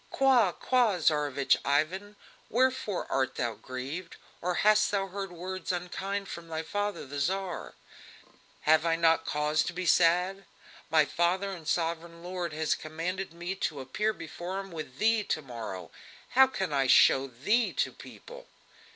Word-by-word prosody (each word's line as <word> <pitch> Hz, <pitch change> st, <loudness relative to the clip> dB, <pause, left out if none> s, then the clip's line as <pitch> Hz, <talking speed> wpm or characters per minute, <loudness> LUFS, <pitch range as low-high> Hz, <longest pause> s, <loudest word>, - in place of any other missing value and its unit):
"Qua! 255 Hz, -8 st, +4 dB
qua! 240 Hz, -2 st, +2 dB
Tsarevich 145 Hz, -4 st, +2 dB
Ivan! 185 Hz, +9 st, 0 dB, 0.3 s
wherefore 255 Hz, -5 st, +1 dB
art 130 Hz, -1 st, 0 dB
thou 120 Hz, -2 st, -1 dB
grieved? 130 Hz, -, -6 dB, 0.3 s
Or 180 Hz, +1 st, -1 dB
hast 215 Hz, 0 st, +5 dB
thou 200 Hz, -1 st, 0 dB
heard 195 Hz, 0 st, -6 dB
words 185 Hz, +2 st, -4 dB
unkind 195 Hz, +3 st, -3 dB
from 170 Hz, -2 st, -8 dB
thy 160 Hz, 0 st, -3 dB
father 205 Hz, +4 st, -3 dB
the 140 Hz, +1 st, -5 dB
Tsar?" 185 Hz, +4 st, -2 dB, 0.9 s
"Have 155 Hz, +1 st, +4 dB
I 165 Hz, -1 st, +2 dB
not 165 Hz, 0 st, +3 dB
cause 150 Hz, +1 st, +1 dB
to -, -, -3 dB
be 185 Hz, +1 st, -4 dB
sad? 180 Hz, +3 st, +3 dB, 0.4 s
My 155 Hz, -2 st, +5 dB
father 180 Hz, +5 st, 0 dB
and 170 Hz, -5 st, -8 dB
sovereign 170 Hz, 0 st, -2 dB
lord 180 Hz, -2 st, -4 dB
has 155 Hz, 0 st, 0 dB
commanded 170 Hz, +5 st, -4 dB
me 175 Hz, +2 st, -4 dB
to 155 Hz, -6 st, -2 dB
appear 175 Hz, +12 st, -1 dB
before 175 Hz, +1 st, -6 dB
him 195 Hz, -1 st, -8 dB
with 155 Hz, -6 st, -7 dB
thee 220 Hz, +2 st, +3 dB
to 155 Hz, -, -1 dB
morrow! 110 Hz, -, -7 dB, 0.4 s
How 265 Hz, +1 st, +6 dB
can 190 Hz, -, -3 dB
I 135 Hz, -1 st, +2 dB
show 135 Hz, +1 st, +6 dB
thee 180 Hz, -, +1 dB
to -, -, 0 dB
people?" -, -, -12 dB
175 Hz, 155 wpm, -29 LUFS, 155-195 Hz, 0.9 s, How